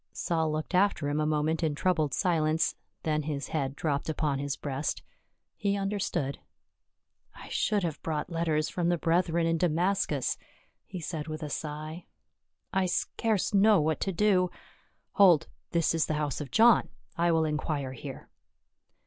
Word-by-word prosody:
Saul 160 -2 0
looked 155 +4 -3
after 180 -6 +2
him 145 +1 0
a 150 - +1
moment 155 +1 0
in 155 -3 0
troubled 155 -3 +1
silence, 160 -2 +1 0.3
then 155 -1 +1
his 145 -2 -4
head 140 -3 -2
dropped 145 0 -1
upon 150 -3 0
his 140 0 -2
breast. 140 +1 -3 0.5
He 200 -1 0
understood. 195 -8 -2 0.5
" - - -41
I - - -12
should 210 -3 +1
have 165 -4 -3
brought 155 +1 -3
letters 160 -2 0
from 175 -1 -1
the 175 - +2
brethren 170 0 +1
in 165 0 +1
Damascus," 175 -4 +1 0.5
he 185 - -6
said 160 -1 -4
with 155 0 -5
a 150 - -5
sigh. 155 +3 -5 0.3
" - - -57 0.3
I 190 -1 +2
scarce 215 +3 0
know 205 0 +6
what 155 0 0
to 195 - -1
do 185 -1 +3 0.3
— - - -41
Hold, 185 -7 +6 0.2
this 170 -1 +2
is 165 -1 +1
the 155 - 0
house 150 -2 -2
of 145 - -6
John, 225 - +5 0.3
I 170 0 +2
will 160 -1 +3
inquire 150 -3 -2
here." 125 - -8
160 Hz, 165 wpm, -29 LUFS, 150-180 Hz, 0.5 s, know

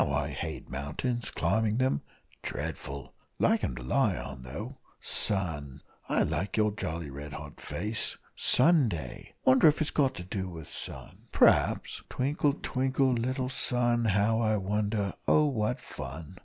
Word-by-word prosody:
How - - -2
I - - 0
hate - - -5
mountains 80 - -3
climbing 110 +1 +1
them 130 - +2 0.4
dreadful! 70 -1 -5 0.2
Like - - +3
'em 65 - -1
to 60 - -7
lie 60 - +2
on, 70 -1 -7
though 65 0 -7 0.2
sun, 75 -9 -1 0.3
I - - +3
like 85 +8 -2
your 105 -1 +3
jolly 85 -7 -4
red 70 +1 -7
hot - - -9
face 105 +5 -2 0.2
Sunday! 125 - +2
wonder 130 +5 +7
if's 155 0 +3
got 135 -3 +2
to 90 - -6
do 95 +1 -3
with 80 -4 -8
sun - - -8
p'raps - - +3
twinkle, 145 +2 +1
twinkle, 130 0 +2
little 130 +2 -1
sun, 120 -2 +1
how 105 +2 +3
I 110 -2 +2
wonder 105 0 0
oh, 150 - +5
what 110 -7 0
fun! 75 +7 -8
105 Hz, 145 wpm, -30 LUFS, 80-125 Hz, 0.4 s, wonder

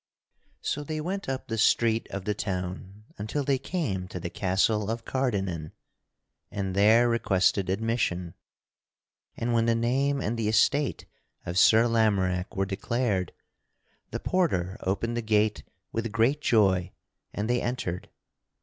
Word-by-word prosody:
So 145 - -2
they 155 +1 -4
went 185 +2 -3
up 135 0 -3
the 115 0 -3
street 115 +1 +3
of 100 -1 -5
the 105 - 0
town 95 +1 -5 0.2
until 110 +8 -2
they 135 -1 +1
came 120 - -2
to 90 - -6
the 85 0 -5
castle 100 +3 +1
of 115 0 -3
Cardennan 95 -12 -2 0.8
and 95 -2 -3
there 110 +4 +5
requested 100 -4 +2
admission. 95 -5 -1 1.0
And 120 +1 -1
when 115 0 +2
the 115 - +3
name 135 +5 +1
and 115 -2 -2
the 110 - 0
estate 135 +6 +2 0.4
of 90 +2 0
Sir 110 +3 +6
Lamorack 100 -5 +1
were 95 - +2
declared, 100 -1 -1 0.8
the - - -4
porter 95 - 0
opened 115 +5 -1
the - - 0
gate 105 -6 +1 0.3
with 115 -1 -2
great 115 +7 +2
joy 95 -8 +2 0.4
and 105 +1 -3
they 120 0 +1
entered. 105 -8 -3
110 Hz, 140 wpm, -27 LUFS, 95-120 Hz, 1.0 s, Sir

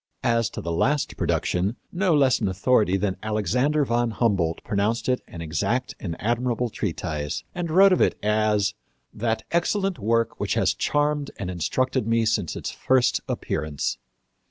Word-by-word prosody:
As 115 -4 +2
to - - -6
the 85 - -4
last 140 - +1
production, 95 +6 0 0.2
no 180 -2 +2
less 135 -3 +4
an 105 - 0
authority 95 0 +2
than 95 -1 -1
Alexander 125 - +1
von 120 -1 +1
Humboldt 100 -8 0
pronounced 110 +3 -1
it 125 -1 +1
an 85 - -9
exact 115 - -1
and 85 -5 -4
admirable 120 +1 0
treatise, 80 -7 -3
and 175 -2 -3
wrote 190 +4 +6
of - - +2
it - - +3
as 105 -1 +2 0.4
"that 110 0 -1
excellent 190 0 0
work 115 +2 0
which - - -1
has - - +2
charmed 145 -1 0
and 95 -5 -4
instructed 130 - -1
me 115 0 +2
since 110 -6 0
its - - -4
first 130 -1 +2
appearance." 75 -5 -2
115 Hz, 155 wpm, -24 LUFS, 100-130 Hz, 0.4 s, wrote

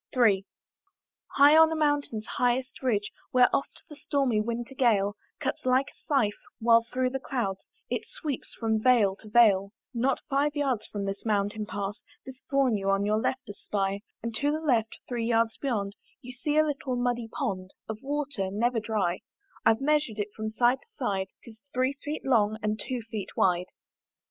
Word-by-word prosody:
III. 205 -6 +4 0.9
High 285 +2 +8
on 320 0 +7
a - - 0
mountain's 290 -8 0
highest 250 +1 -1
ridge, 210 -6 0 0.2
Where 250 -1 +5
oft - - -3
the 300 - -11
stormy 275 -6 +1
winter 235 +3 -4
gale 210 -6 +2 0.2
Cuts - - -3
like 255 +2 +2
a - - -30
scythe, 255 -9 +1 0.2
while 230 0 +6
through 255 +2 -1
the 270 - -2
clouds 235 -8 -2 0.3
It - - -3
sweeps 310 - -5
from 220 -2 0
vale 220 -6 +4
to 215 - -13
vale; 205 -3 +5 0.2
Not 250 +3 +1
five 285 +1 +1
yards 270 -7 0
from 200 -1 -4
the 195 0 -1
mountain 210 0 0
path, 205 +1 -4 0.2
This 265 0 -10
thorn 270 -6 +3
you 195 0 -1
on 195 +1 +2
your 215 +1 +2
left 260 +3 -2
espy; 200 0 -2 0.2
And 230 0 -3
to 290 +3 +1
the 310 - -1
left, 240 -8 +1
three 235 -2 -2
yards 230 -1 +2
beyond, 210 -8 -2 0.3
You 250 - -9
see 295 +4 -1
a 310 - +6
little 275 -3 -2
muddy 245 -1 -1
pond 200 -8 -3 0.2
Of 220 -1 -6
water, 280 -8 -2
never 230 +4 +1
dry; 210 -5 -1 0.5
I've 225 +3 +4
measured 295 -6 +1
it 205 0 -2
from 215 0 -3
side 240 +4 +2
to - - -26
side: 195 -7 -1 0.2
'Tis 220 -2 -13 0.2
three 255 +2 +2
feet 300 +1 -4
long, 220 -5 +3
and 215 0 0
two 250 -3 -3
feet 210 -3 -4
wide. 180 -1 +2
235 Hz, 180 wpm, -28 LUFS, 210-270 Hz, 0.9 s, High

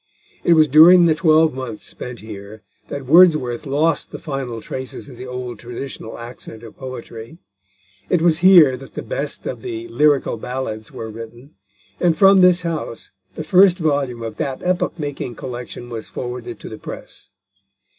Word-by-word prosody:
It 170 - +5
was 155 -2 +5
during 170 +5 +8
the 165 - +4
twelve 160 -1 +3
months 130 -4 -6
spent 125 -1 -7
here 105 0 -10 0.2
that 140 -2 -6
Wordsworth 155 -5 +4
lost 150 +2 +1
the - - -6
final 135 -6 -5
traces 130 +4 -7
of 130 - -11
the 125 +2 -9
old 125 -3 -6
traditional 120 -1 -7
accent 115 -1 -9
of 115 - -12
poetry. 125 0 -9 0.7
It 180 - +3
was 165 -1 +3
here 175 -7 +7
that 135 +1 -13
the - - -6
best - - -4
of - - -5
the 350 -2 -6
Lyrical 150 - +2
Ballads 110 -3 -5
were 110 -1 -7
written, 115 +5 -11 0.5
and 170 -3 +2
from 195 +2 +6
this 180 -1 +5
house 160 -8 -4 0.2
the 155 - -5
first 185 +1 +5
volume 140 -8 -1
of 110 -2 -6
that 135 -2 -4
epoch 180 0 -1
making 145 -5 -5
collection 120 -1 -7
was 115 -2 -7
forwarded 120 -2 -6
to - - -8
the 110 - -9
press. - - -9
135 Hz, 165 wpm, -20 LUFS, 120-165 Hz, 0.7 s, during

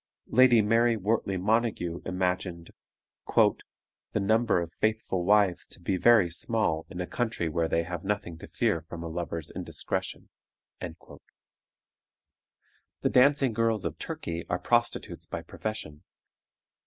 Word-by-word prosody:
Lady 125 -3 +6
Mary 115 +2 +3
Wortley 100 -1 0
Montague 105 -4 0
imagined 90 -2 -2 0.6
"the - - 0
number 110 0 +2
of 85 -1 -5
faithful 110 -4 -1
wives 100 -2 +3
to - - -8
be 90 +2 -1
very 110 0 +5
small 85 -2 -1
in 90 - -8
a 90 - -1
country 110 -5 -2
where 80 +1 0
they 85 0 +1
have 85 0 -5
nothing 100 -3 -2
to - - -10
fear 80 - 0
from 85 +1 -8
a - - -4
lover's 85 -1 -4
indiscretion." - - -4 0.5
The - - -9 1.9
dancing 135 -1 +4
girls 115 -2 +1
of - - -4
Turkey 85 0 -4
are 90 - +1
prostitutes 120 +4 0
by - - -5
profession. 95 -9 -6
95 Hz, 130 wpm, -28 LUFS, 85-115 Hz, 1.9 s, Lady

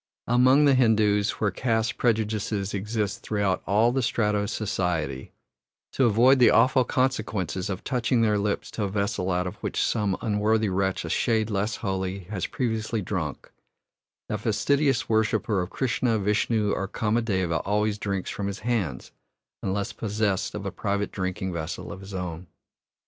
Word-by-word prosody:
Among 130 +4 +5
the 140 - +5
Hindoos, 110 -5 +3
where 105 -2 +1
caste 115 -2 0
prejudices 110 -3 0
exist 105 0 -2
throughout 100 -3 0
all 110 +4 +4
the 135 +1 0
strata 110 -3 +1
of 100 0 -2
society, 85 -11 -2 0.6
to 135 - +2
avoid 120 +4 +5
the 120 - +7
awful 130 0 +4
consequences 110 - -1
of 95 -1 -4
touching 125 -1 +1
their 105 -2 +2
lips 100 0 -2
to 105 - -2
a - - -2
vessel 100 -1 -1
out 90 0 0
of 90 - -5
which - - -3
some 105 -4 0
unworthy 110 0 +1
wretch 95 0 -1
a - - -5
shade 110 -1 +1
less 105 +2 0
holy 95 -1 -3
has 95 -5 -2
previously 110 -3 -2
drunk, 85 -8 -4 0.8
the 105 - -3
fastidious 135 +5 +1
worshipper 110 -2 +1
of 90 - -4
Krishna, 125 -2 0
Vishnu, 105 +1 +1
or 95 - -1
Kamadeva 105 -6 0
always 105 +1 0
drinks 100 -3 -2
from 100 - -3
his 100 +1 -5
hands, 105 - -2 0.5
unless 100 +1 -2
possessed 105 -3 -1
of - - -5
a - - -2
private 100 0 -2
drinking 95 -1 -3
vessel 80 -2 -5
of - - -8
his 95 0 -8
own. 90 -1 -5
105 Hz, 160 wpm, -26 LUFS, 95-115 Hz, 0.8 s, the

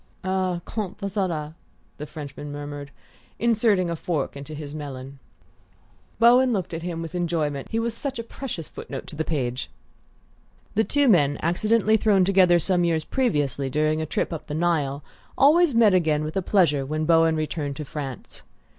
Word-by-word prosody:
"Ah, 185 -2 -1
quant 210 -4 -4
à 200 -1 -4
cela 165 -6 -2 0.2
" - - -38
the 150 - -5
Frenchman 145 -1 -8
murmured, 145 -1 -6 0.5
inserting 220 -5 +2
a 170 - -2
fork 155 -4 -2
into 140 +2 -8
his 145 -1 -7
melon. 140 -2 -7 1.0
Bowen 245 +2 +5
looked 190 -6 -2
at 165 - -4
him 170 -1 -4
with 165 - -7
enjoyment 160 -5 -1
he 225 - -2
was 230 0 -1
such 275 +2 -4
a 230 - -4
precious 230 - -6
foot - - -10
note 135 - -5
to - - -10
the 160 - -1
page! 130 -6 -2 1.0
The 220 - +3
two 285 +4 +2
men, 145 - +4
accidentally 215 +6 +3
thrown 200 -4 +3
together 185 -2 +5
some 175 +1 +2
years 165 -2 +1
previously 145 - 0
during 155 +3 +1
a 155 - -3
trip 155 - -1
up 160 - -7
the 150 - -4
Nile, 150 -4 0 0.3
always 305 0 +5
met 225 -4 +5
again 155 -4 +2
with 155 +1 -4
pleasure 160 -9 +3
when 155 +3 -2
Bowen 165 0 +4
returned 155 -2 -3
to 150 - -6
France. 135 -3 -7
165 Hz, 175 wpm, -24 LUFS, 150-200 Hz, 1.0 s, Bowen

